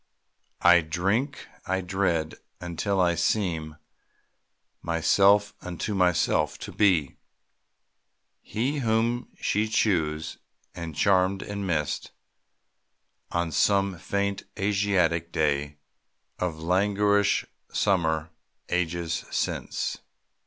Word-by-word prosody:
I 90 0 +7
drink, 95 - -1 0.2
I 95 +1 0
dread, 90 -4 0 0.3
until 90 +3 -2
I 90 -1 +3
seem 85 -3 -1 1.1
(Myself 100 +5 +3
unto 90 +4 -4
myself) 90 -5 +2
to - - -6
be 90 -9 +2 1.2
He 130 +7 -2
whom 115 0 0
she 105 +2 +1
chose, 80 -8 0 0.3
and 85 -3 -7
charmed 95 +3 +2
and 100 -1 -4
missed, 75 -4 -1 1.2
On 85 -1 -1
some 100 +1 +2
faint 100 +2 -1 0.2
Asiatic 95 -5 +1
day 75 -2 0 0.6
Of 90 -3 -2
languorous 100 +4 +2 0.3
summer, 80 -4 +1 0.4
ages 85 -1 -1
since. - - -2
90 Hz, 90 wpm, -26 LUFS, 80-100 Hz, 1.2 s, I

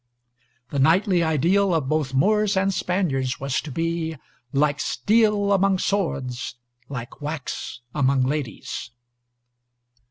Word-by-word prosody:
The 140 - -1
knightly 175 +6 +4
ideal 170 +4 +2
of 150 -5 0
both 155 -2 0
Moors 210 +6 +3
and 195 +1 +2
Spaniards 145 -10 -1
was 135 -1 -1
to 155 - -8
be 165 +1 -2 0.3
"Like 145 +1 +2
steel 205 - +2
among 195 0 +3
swords, 135 -13 -2 0.3
Like 125 0 -7
wax 145 -4 -5
among 135 -2 +2
ladies." 135 -3 -3
160 Hz, 115 wpm, -24 LUFS, 135-195 Hz, 0.3 s, knightly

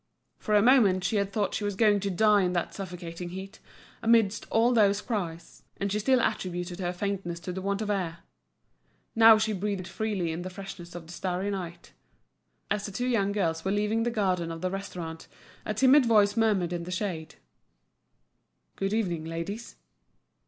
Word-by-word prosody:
For 215 - 0
a 205 - +5
moment 220 -8 +5
she 210 +4 +1
had 200 -1 0
thought 205 0 -1
she - - -2
was 205 -1 -2
going 210 -1 +4
to 200 0 -2
die 210 +2 +4
in 180 -1 0
that 175 -2 -2
suffocating 175 -2 -7
heat, 190 +4 -8 0.4
amidst 225 -3 +3
all 235 +2 +3
those 205 -3 +4
cries; 170 -8 -5 0.2
and 200 0 -2
she 210 - 0
still 260 +4 +3
attributed 175 -4 -2
her 175 -2 -1
faintness 180 -2 -3
to 175 - -5
the 190 +1 -5
want 200 +2 -1
of 210 - -2
air. 170 -4 -2 0.9
Now 225 -1 +8
she 215 0 0
breathed 195 -2 -3
freely 200 -7 -2
in 165 +2 -4
the 185 - -5
freshness 185 -2 -9
of 170 -2 -7
the 165 - -11
starry 185 +2 -2
night. 175 -3 -6 0.8
As 210 0 -1
the - - -7
two 245 +5 -2
young 215 -6 +1
girls 165 -6 -1
were 190 - -1
leaving 210 +3 +1
the 240 - +1
garden 185 -7 0
of 165 0 -7
the 185 0 -1
restaurant, 175 -4 -6 0.4
a 215 - 0
timid 260 +3 +5
voice 205 -2 +4
murmured 205 -6 +2
in 175 - -3
the - - -8
shade: 180 -5 -4 1.4
"Good 195 +1 -2
evening, 175 -8 -1
ladies." 170 +8 -5
195 Hz, 185 wpm, -28 LUFS, 175-215 Hz, 1.4 s, Now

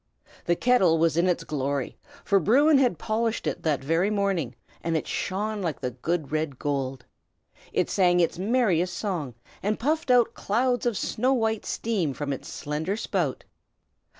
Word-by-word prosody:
The 175 - +2
kettle 190 -8 +4
was 165 -1 +2
in 170 +2 +3
its 180 - +1
glory, 140 -2 -2 0.3
for 200 - +4
Bruin 275 - +5
had 245 -10 +2
polished 225 +1 -1
it - - -2
that 145 -4 0
very 165 +7 +2
morning, 195 - -1 0.3
and 165 -1 0
it - - -3
shone 210 +2 -2
like 165 -6 -2
the 125 - -3
good 150 +4 -3
red 155 -3 -2
gold. 135 -3 -3 0.7
It - - +1
sang 180 -2 +3
its 170 0 +1
merriest 190 -5 +1
song, 165 - -3 0.3
and 210 +2 0
puffed 305 +3 0
out 245 -2 +4
clouds 245 +3 0
of 230 -4 0
snow 255 +4 +1
white 225 -3 0
steam 185 - -1
from 145 -2 -2
its 135 - -8
slender 155 +7 -3
spout. 175 - -2
180 Hz, 165 wpm, -26 LUFS, 155-220 Hz, 0.7 s, Bruin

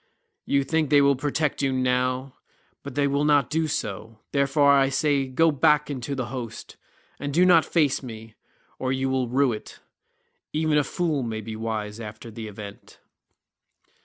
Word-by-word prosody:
You 140 0 +2
think 155 +1 0
they 145 -1 +6
will 140 0 +4
protect 145 +2 -1
you 135 -1 +1
now, 130 0 0 0.5
but 140 -2 -9
they 145 - +2
will 140 +1 +1
not 145 -3 +3
do 160 0 +1
so; 110 -4 -4
therefore 140 +1 +3
I 135 -1 +4
say 140 0 +1
go 160 +5 +3
back 150 +1 +2
into 135 0 -4
the 130 -2 -2
host, 115 -4 -7 0.4
and 145 +1 -3
do 175 +5 +4
not 170 -3 +6
face 150 -6 +1
me, 110 -3 -9 0.5
or 130 - -1
you 130 0 -1
will 130 -1 0
rue 130 +1 +2
it. 105 - -9 0.8
Even 155 -1 +2
a - - +2
fool 160 -3 -1
may 115 -3 -3
be 110 +1 -7
wise 110 -1 -4
after 110 +1 -8
the 110 0 -7
event." 100 -1 -11
135 Hz, 170 wpm, -25 LUFS, 115-145 Hz, 0.8 s, they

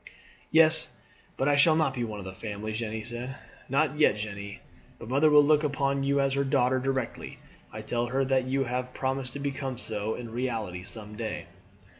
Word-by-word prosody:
"Yes; 160 0 +5 0.4
but 135 - +1
I 145 - +4
shall 155 +3 +6
not 155 -4 +2
be 125 -2 -2
one 110 -2 -4
of 100 - -8
the 95 - -6
family," 105 +1 -5
Jeanne 110 -1 -3
said. 120 +3 -5 0.3
"Not 145 +2 +1
yet, 150 - +5
Jeanne. 100 -1 -6 0.4
But 115 - -10
mother 140 +4 +4
will 150 -1 +7
look 150 +1 +4
upon 140 -1 0
you 140 +1 +1
as 135 -1 +2
her 140 0 +1
daughter 130 -1 +2
directly 130 -1 -3 0.3
I 110 0 -7
tell 120 +2 -1
her 135 +2 0
that 130 -1 +1
you 135 +1 +1
have 125 0 -3
promised 130 -1 -2
to 140 - -6
become 135 -2 -3
so 110 0 -3
in 120 -2 -7
reality 115 -7 -3
some 105 +2 -7
day." 110 -1 -4
130 Hz, 195 wpm, -28 LUFS, 110-140 Hz, 0.4 s, will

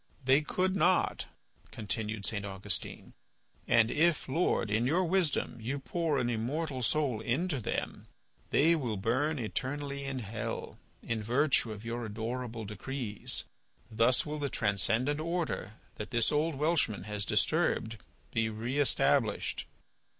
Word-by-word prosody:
"They 135 +3 +5
could 185 +5 0
not," 185 0 +2 0.4
continued 110 -1 -3
St. 105 -2 +1
Augustine. 100 -2 -4 0.5
"And 115 -1 +4
if, 165 +1 +2
Lord, 135 - +1
in 115 +3 +2
your 170 +7 +3
wisdom, 175 -8 +1
you 130 +6 -2
pour 160 +1 -1
an 120 - +1
immortal 130 +5 -2
soul 130 -2 +1
into 140 +6 0
them, 110 - -3 0.4
they 160 +4 +4
will 125 -10 -1
burn 130 +10 +1
eternally 140 +4 -3
in 135 -1 -3
hell 115 -2 -5 0.2
in 115 -1 -2
virtue 125 +1 +2
of 105 +1 -8
your 120 +1 -3
adorable 115 +1 -4
decrees. 105 +2 -4 0.5
Thus 115 +3 +3
will 150 0 -4
the 140 -1 -1
transcendent 115 +7 +2
order, 165 - -2 0.2
that 105 - -5
this 120 -3 +2
old 155 +1 +1
Welshman 145 - +1
has 105 0 -1
disturbed, 110 +3 +1 0.3
be 115 -1 +1
re 115 +6 -3
established." 70 - +2
125 Hz, 135 wpm, -31 LUFS, 110-150 Hz, 0.5 s, They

